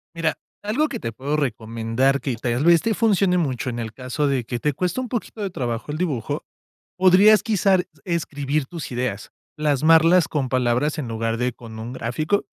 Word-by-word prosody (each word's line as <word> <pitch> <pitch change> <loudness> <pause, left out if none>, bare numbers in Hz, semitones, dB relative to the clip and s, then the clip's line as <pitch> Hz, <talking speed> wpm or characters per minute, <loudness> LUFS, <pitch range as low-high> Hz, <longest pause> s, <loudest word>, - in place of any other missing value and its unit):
Mira, 165 -1 0 0.3
algo 255 +10 0
que 240 - -4
te 115 - -4
puedo 140 +6 -2
recomendar 115 +1 0
que 125 -1 -2
tal 120 +4 -1
vez 170 -1 +6
te 225 - 0
funcione 200 -4 +2
mucho 130 -7 -1
en 120 -1 -4
el 110 -1 -5
caso 130 +4 -2
de 135 -3 0
que 120 +1 -4
te 150 +4 0
cueste 180 - -2
un 255 - -3
poquito 230 -2 -5
de 200 - -1
trabajo 120 -8 -4
el 150 - -3
dibujo, 150 -10 -2 0.5
podrías 190 +4 +6
quizás 195 -4 +2 0.2
escribir 150 -4 -1
tus 165 0 -7
ideas. 120 -4 -3 0.3
Plasmarlas 160 +3 +4
con 140 -4 -2
palabras 125 +4 +1
en 145 -5 -3
lugar 115 0 -2
de 125 +1 -1
con 115 -1 -11
un 115 +3 -6
gráfico. 155 - -1
145 Hz, 185 wpm, -22 LUFS, 120-180 Hz, 0.5 s, vez